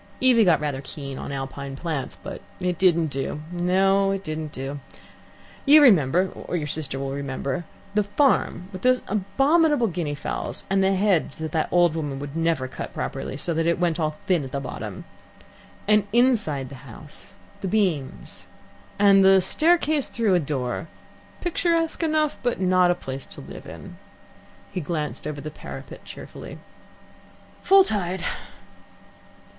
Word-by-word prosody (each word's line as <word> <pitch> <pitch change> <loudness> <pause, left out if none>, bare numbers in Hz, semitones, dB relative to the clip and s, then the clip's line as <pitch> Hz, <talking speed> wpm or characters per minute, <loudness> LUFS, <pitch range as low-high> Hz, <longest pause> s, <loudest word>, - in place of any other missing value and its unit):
Evie 250 -3 +5
got 170 -4 +4
rather 145 -3 -2
keen 140 -1 -7
on - - -6
Alpine 135 0 -5
plants. 150 -2 -4
But 195 - -7 0.2
it 180 -2 -1
didn't 170 -4 +3
do 135 +2 -3
no, 190 +3 +2
it 195 0 -2
didn't 155 -3 -4
do. 135 +2 -5 0.8
You 295 +2 +8
remember, 185 - +5
or - - -6
your 155 - -2
sister 145 -2 -3
will 135 0 -3
remember, 140 +4 -3 0.3
the 210 - +3
farm 205 -5 +1
with 185 -2 -8
those 255 +2 +3
abominable 275 - +2
guinea 170 -7 -2
fowls, 145 - -4
and 195 0 +3
the 195 0 +3
hedge 190 -7 +2
that 160 -1 -5
the 160 -1 0
old 175 -2 +4
woman 145 -4 -3 0.2
never 165 -4 0
would 130 - -6
cut - - -7
properly, 135 -1 -4
so 170 +3 -1
that 165 +1 0
it 170 - +3
all - - -13
went 175 -1 0 0.3
thin 175 -5 +2
at 130 - -7
the 140 - -2
bottom. 135 -2 -6 0.8
And, 210 -1 +4
inside 210 - +2
the 135 -2 -11
house, 150 - -9 0.2
the 195 - -3
beams 180 -10 -1 0.5
and 200 -1 +6
the 190 0 +7
staircase 310 - +2
through 225 -5 +1
a 180 - +4
door 140 -1 -3 0.5
picturesque 335 -2 0
enough, 310 -2 +1
but 245 -5 -1
not 185 -1 +4
a 175 - +3
place 135 -5 -6
to - - -10
live - - -10
in." - - -10 0.7
He 180 - -3
glanced 150 -2 -3
over 145 -1 -5
the 155 +2 -6
parapet - - -9
cheerfully. - - -9 1.0
"Full 390 0 +7
tide. 190 - -2
175 Hz, 160 wpm, -24 LUFS, 145-205 Hz, 1.0 s, You